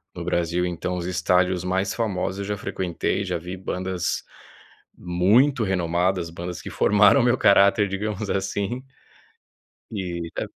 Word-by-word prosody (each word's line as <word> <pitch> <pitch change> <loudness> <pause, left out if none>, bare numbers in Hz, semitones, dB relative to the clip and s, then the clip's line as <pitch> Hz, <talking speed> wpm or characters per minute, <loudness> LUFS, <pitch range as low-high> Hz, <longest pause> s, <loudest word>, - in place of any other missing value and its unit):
no - - -5
Brasil, 85 +1 0
então 90 +1 -3
os 85 - -4
estádios 90 0 +1
mais 95 +1 -1
famosos, 95 -4 -2
eu 100 - -3
já 105 +1 -3
frequentei, 95 +2 -2
já 90 -2 -2
vi 90 +3 -7
bandas 90 -1 -3 0.7
muito 105 +10 +3
renomadas, 90 -1 0
bandas 85 +1 -6
que - - -7
formaram 105 +5 +4
o - - +1
meu 120 +1 +3
caráter, 100 0 +5
digamos, 105 +1 -3
assim 100 +5 -2 1.1
Eh, 90 -5 -4
é - - -1
95 Hz, 140 wpm, -24 LUFS, 90-100 Hz, 1.1 s, caráter